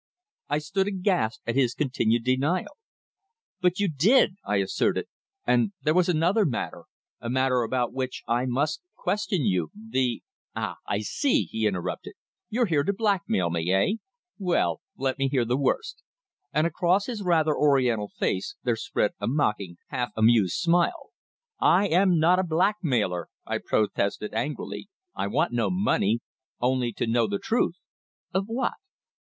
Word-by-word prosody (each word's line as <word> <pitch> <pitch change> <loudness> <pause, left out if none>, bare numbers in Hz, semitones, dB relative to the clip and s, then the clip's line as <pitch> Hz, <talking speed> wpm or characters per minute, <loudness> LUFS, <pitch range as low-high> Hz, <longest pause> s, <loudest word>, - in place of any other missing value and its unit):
I - - +1
stood 190 +6 -1
aghast 185 - 0
at 115 - -1
his 125 -2 +2
continued 120 -5 +1
denial. 145 - 0 0.9
"But 180 +1 +2
you 205 - +2
did," 185 - +4
I 105 - -1
asserted. 100 -1 +1 0.4
"And 125 - +2
there 155 - +3
was 180 +1 +3
another 180 +6 +3
matter 135 - -3 0.3
a 115 - -5
matter 130 0 +2
about 120 +1 -1
which 130 -1 -4
I 120 +2 +1
must 145 - 0
question 210 - -1
you 90 -5 +1
the 130 - -2
" - - -51
"Ah! - - -3
I 100 - -1
see!" 265 - +1
he 110 -1 -1
interrupted. 95 -4 -4 0.3
"You're 240 +3 +1
here 160 -8 +2
to 195 - +1
blackmail 190 - 0
me 85 +1 -1
eh? 95 - +2 0.4
Well 175 - +1 0.2
let 135 +1 -1
me 135 - +2
hear 130 -3 +1
the 120 +2 +1
worst," 450 - -1 0.5
and 155 +1 +2
across 175 +4 +2
his 235 -5 -4
rather 160 -5 +2
Oriental 125 -7 +2
face 95 -1 -2
there 120 -2 +1
spread 230 - -1
a - - -2
mocking, 105 - 0
half 125 -4 -2
amused 110 -4 +4
smile. 180 - +1 0.5
"I 185 +4 +4
am 180 0 +4
not 170 +4 +4
a - - +2
blackmailer!" 160 - 0 0.2
I - - -2
protested 105 0 -1
angrily. 150 - -4 0.2
"I - - -2
want 150 +7 0
no 120 -1 +1
money 180 - +1 0.4
only 125 -1 +1
to - - -2
know 115 0 +2
the 100 -1 -1
truth." - - 0 0.6
"Of 190 +1 +1
what?" 240 +2 -1
140 Hz, 155 wpm, -26 LUFS, 115-185 Hz, 0.9 s, did